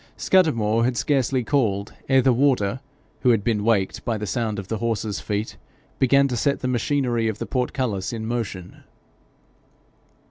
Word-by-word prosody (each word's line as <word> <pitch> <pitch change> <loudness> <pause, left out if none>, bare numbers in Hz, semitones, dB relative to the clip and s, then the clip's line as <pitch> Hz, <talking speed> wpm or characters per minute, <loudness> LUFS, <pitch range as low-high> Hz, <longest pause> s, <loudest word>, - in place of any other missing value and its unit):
Scudamore 115 - +2
had 125 0 0
scarcely 135 -3 +1
called, 110 -7 0 0.2
ere 135 -1 +4
the 130 - +4
warder, 125 -3 +1 0.4
who 125 - +2
had 115 -4 +3
been 105 -2 0
waked 105 -4 +1
by 115 -2 -1
the 105 - -4
sound 110 +2 -2
of 100 -2 -6
the 110 0 -3
horse's 110 -2 -2
feet, 105 +1 -3 0.4
began 140 +1 +4
to 125 - -3
set 140 +5 0
the 130 - -1
machinery 125 -2 0
of 110 -2 -2
the - - -4
portcullis 125 -6 -2
in 110 -2 -5
motion. 110 -6 -5
115 Hz, 165 wpm, -23 LUFS, 105-130 Hz, 0.4 s, ere